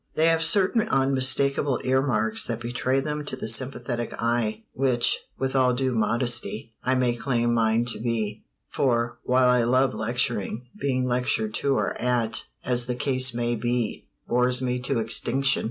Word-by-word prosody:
They 160 +1 +4
have 165 0 +2
certain 195 +6 +2
unmistakable 135 0 +2
earmarks 130 -4 +1
that 115 -1 -3
betray 125 +3 -1
them 150 +1 -3
to 140 - -2
the 130 - -6
sympathetic 120 0 -2
eye 115 -2 -1
which, 125 -2 +1 0.2
with 135 0 -2
all 130 -2 +3
due 130 0 0
modesty, 115 0 0
I 130 +1 +2
may 125 -2 +2
claim 120 -1 0
mine 115 0 +2
to - - -8
be; 110 -3 -2 0.2
for, 120 -3 0
while 125 0 +3
I 125 -1 +4
love 130 +2 +2
lecturing, 115 0 -2
being 130 -10 -1
lectured 120 -3 0
to 140 +3 +1
or - - 0
at, 120 -3 0 0.2
as 125 -1 0
the 125 - -1
case 130 -1 -1
may 120 0 0
be, 120 0 -2 0.2
bores 125 +1 +2
me 125 -1 -1
to 125 +1 -1
extinction. 120 +4 +1
125 Hz, 160 wpm, -25 LUFS, 120-130 Hz, 0.2 s, They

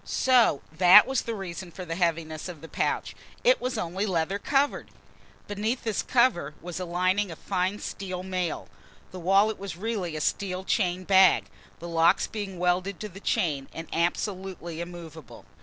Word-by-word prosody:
So 245 - +3
that 180 +6 +8
was 265 -1 0
the 230 - -4
reason 185 -2 -6
for 180 +2 -8
the 165 - -4
heaviness 165 -1 -1
of 165 -5 -9
the 165 - -9
pouch - - -2 0.3
it - - +4
was 255 0 -2
only 185 +5 -2
leather 185 +2 -1
covered! 280 +5 0 0.6
Beneath 215 +5 -2
this 220 -4 -1
cover 235 - +2
was 175 +2 -6
a 185 - -3
lining 185 +3 +1
of 165 - -8
fine 190 +1 -1
steel 185 -3 -5
mail. 185 -3 -3 0.4
The 185 - -8
wallet 195 +5 +3
was 195 -4 -6
really 195 -5 -3
a 155 - -3
steel 185 +3 -1
chain 185 -2 0
bag, 185 - +4 0.3
the 170 - -8
locks 170 +2 +3
being 200 -4 -6
welded 180 +2 0
to 210 - -5
the 195 +1 -11
chain 145 -8 -1
and 165 0 -7
absolutely 175 -1 -2
immovable. 165 -5 -10
185 Hz, 170 wpm, -27 LUFS, 170-200 Hz, 0.6 s, that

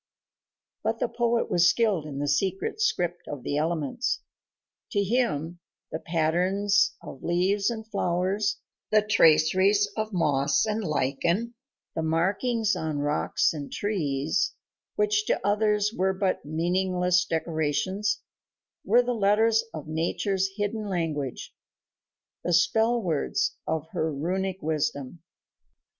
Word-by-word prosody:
But - - 0
the - - 0
poet 235 -1 0
was 175 0 +5
skilled 200 -8 +1
in 140 -2 -6
the 145 +1 -2
secret 190 - -1
script 175 - 0
of 145 -3 -6
the 145 - -1
elements. 160 - -1 0.7
To 200 - +2
him 175 - -1 0.3
the 160 - -3
patterns 185 +6 +1
of 135 - -10
leaves 190 +4 +1
and 220 -2 -5
flowers, 195 +1 0 0.3
the 215 -1 +4
traceries 190 +2 +4
of 215 0 -2
moss 145 -5 +2
and 215 0 -1
lichen, 170 - 0 0.4
the - - -2
markings 200 +8 +1
on 155 -2 -3
rocks 145 +3 +1
and 145 -3 -6
trees, 160 -4 -1 0.4
which 425 0 +1
to - - +1
others 210 0 +2
were 190 +1 +1
but 190 -1 0
meaningless 180 +3 +1
decorations, 165 +6 -1 0.6
were 245 - +4
the 245 0 -1
letters 220 +1 +3
of 155 -2 -7
nature's 185 +4 -1
hidden 210 +1 -2
language, 155 -8 -3 0.9
the 175 - 0
spell 220 +8 +3
words 225 - -1
of 160 -1 -2
her 160 - -1
runic 185 +5 -2
wisdom. 150 -1 -2
185 Hz, 120 wpm, -26 LUFS, 160-210 Hz, 0.9 s, was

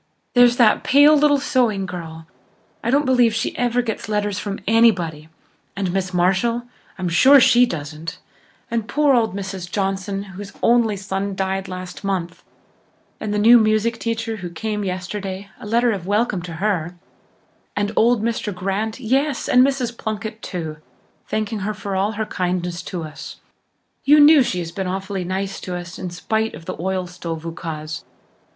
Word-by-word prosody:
There's 245 -1 +5
that 230 -4 +4
pale 290 +3 +6
little 295 -1 +4
sewing 240 -8 +1
girl, 165 -3 -7 0.6
I 230 - -1
don't 285 +3 +3
believe 245 -4 +3
she 225 - -2
ever 245 0 +1
gets 220 -2 -4
letters 205 -2 -1
from 200 -1 -4
anybody, 180 -9 +2 0.5
and 190 -3 -2
Miss 190 -1 -1
Marshall, 195 +7 +1 0.3
I'm 185 -1 -2
sure 265 +12 +7
she 245 0 +5
doesn't, 155 -2 -6 0.5
and 230 -2 -1
poor 295 0 +3
old 225 -6 +2
Mrs. 190 -2 -5
Johnson, 195 0 -2
whose 200 +1 -9
only 230 -3 +3
son 195 0 -3
died 190 0 -2
last 185 +1 -7
month, 180 -3 -3 0.8
and 215 - -3
the 210 - 0
new 230 +3 +7
music 220 +1 +1
teacher 225 -1 -2
who 180 -3 -6
came 210 +5 -3
yesterday, 190 +1 -5
a - - -9
letter 235 +2 +2
of 190 -4 -4
welcome 205 -2 +1
to 170 -1 -7
her 175 -1 -1 0.8
and 205 0 0
old 235 -1 +3
Mr. 230 -2 -1
Grant, 195 +5 -3
yes, 265 +3 0
and 250 - +5
Mrs. 260 -3 0
Plunkett 220 0 -5
too, 160 -5 -5 0.5
thanking 215 0 -2
her 210 +2 -3
for 200 -1 -4
all 200 +3 0
her 220 +1 -2
kindness 180 -2 -2
to 175 -1 -5
us. 155 -1 -8 0.7
You 295 +2 +6
knew 295 0 +8
she 210 -7 -1
has 170 -2 -4
been 190 +1 -3
awfully 190 0 -3
nice 195 +2 -3
to 180 - -5
us 175 0 -7
in 185 - -4
spite 220 +5 -2
of 165 - -12
the - - -4
oil 185 0 -1
stove 170 -2 -6
ukase. 155 -2 -6
200 Hz, 170 wpm, -21 LUFS, 180-230 Hz, 0.8 s, knew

